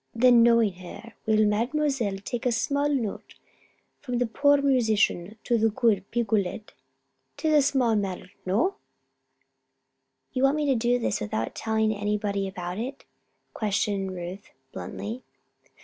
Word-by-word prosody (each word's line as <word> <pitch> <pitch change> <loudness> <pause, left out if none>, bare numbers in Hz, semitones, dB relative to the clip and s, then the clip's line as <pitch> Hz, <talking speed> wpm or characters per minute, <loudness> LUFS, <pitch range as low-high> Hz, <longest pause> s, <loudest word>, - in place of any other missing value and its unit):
"Then, 240 0 +6
knowing 230 -3 +4
her, 185 +5 -10
will 220 - +3
the 215 - +5
Mademoiselle 235 0 0
take 240 0 -2
a - - +2
small 280 +5 0
note 245 -8 -3 0.6
from 250 -4 -3
the 245 - +2
poor 285 +5 +3
musician 220 -7 +1
to 235 -2 +1
the 225 +1 +3
good 210 -3 +1
Picolet? 215 -3 -1 0.6
'Tis 315 -1 +1
a 300 - +6
small 260 -5 +2
matter 190 -3 -3
no?" 220 - +1 1.6
"You 255 - -1
want 270 +2 +4
me 305 -1 0
to 275 - +3
do 240 +1 +2
this 240 - -1
without 110 +2 -2
telling 220 -1 0
anybody 205 -1 -1
about 180 0 -5
it?" 265 +4 -6 0.5
questioned 200 -2 -1
Ruth, 180 +3 -7 0.2
bluntly. 230 +5 -6
225 Hz, 140 wpm, -26 LUFS, 200-255 Hz, 1.6 s, Then